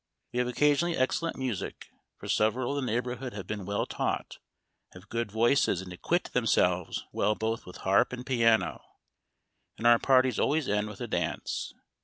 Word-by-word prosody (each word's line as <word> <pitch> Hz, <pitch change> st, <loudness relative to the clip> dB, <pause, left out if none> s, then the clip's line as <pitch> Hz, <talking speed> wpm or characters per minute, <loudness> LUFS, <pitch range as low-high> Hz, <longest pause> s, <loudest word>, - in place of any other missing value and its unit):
We 125 Hz, -, 0 dB
have 125 Hz, -, +1 dB
occasionally 150 Hz, +6 st, +2 dB
excellent 160 Hz, +6 st, 0 dB
music, 125 Hz, -7 st, -4 dB, 0.3 s
for -, -, -9 dB
several 120 Hz, +4 st, +1 dB
of -, -, -2 dB
the 125 Hz, -, -2 dB
neighborhood 125 Hz, +2 st, -3 dB
have 100 Hz, -3 st, -6 dB
been 105 Hz, -1 st, -5 dB
well 100 Hz, 0 st, 0 dB
taught, -, -, -3 dB, 0.5 s
have 95 Hz, +3 st, -14 dB
good 115 Hz, -3 st, -2 dB
voices, 115 Hz, -3 st, +3 dB
and 90 Hz, -1 st, -7 dB
acquit 175 Hz, -, -1 dB
themselves 90 Hz, -7 st, +1 dB
well 105 Hz, +1 st, +1 dB
both 110 Hz, 0 st, -3 dB
with 90 Hz, -, -9 dB
harp 95 Hz, +1 st, +4 dB
and 125 Hz, 0 st, -6 dB
piano; 115 Hz, -4 st, +2 dB, 1.0 s
and 115 Hz, -, -6 dB
our 120 Hz, -1 st, +7 dB
parties 130 Hz, -3 st, +3 dB
always 150 Hz, -1 st, +1 dB
end 105 Hz, +1 st, 0 dB
with 105 Hz, -, -10 dB
a -, -, -3 dB
dance. -, -, -3 dB
115 Hz, 170 wpm, -29 LUFS, 105-130 Hz, 1.0 s, our